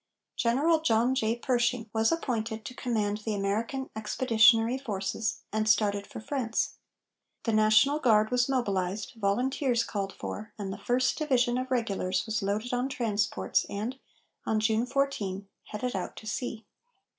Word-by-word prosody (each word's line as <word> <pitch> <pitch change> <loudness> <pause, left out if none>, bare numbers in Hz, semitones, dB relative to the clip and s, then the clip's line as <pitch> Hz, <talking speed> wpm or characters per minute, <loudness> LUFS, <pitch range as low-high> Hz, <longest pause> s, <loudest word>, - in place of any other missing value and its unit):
General 285 +8 +2
John 240 -3 +3
J. 225 -3 +1
Pershing 245 -1 0
was 220 0 +2
appointed 225 -8 -2
to 250 - -6
command 215 -5 -1
the 215 0 -3
American 225 +7 -2
Expeditionary 225 +2 +4
Forces, 210 -3 -3
and 215 0 +1
started 205 -2 +2
for - - -8
France. 230 -1 -2 0.7
The 225 - 0
National 215 +7 +4
Guard 220 -4 +3
was 250 +1 +2
mobilized, 200 -6 -1
volunteers 240 +4 +1
called 195 -2 -3
for, 215 +1 -7
and 195 -2 -4
the 195 - -8
First 250 +7 +1
Division 250 -5 +2
of 255 0 -4
regulars 200 -7 0
was 220 -1 -1
loaded 210 +5 -2
on 250 +2 0
transports 205 - 0
and, 225 +6 -4 0.4
on 220 - +1
June 220 +2 +1
14, 215 -8 -1 0.2
headed 245 +3 -4
out 185 - -4
to - - -11
sea. 225 0 -4
225 Hz, 145 wpm, -29 LUFS, 210-250 Hz, 0.7 s, Expeditionary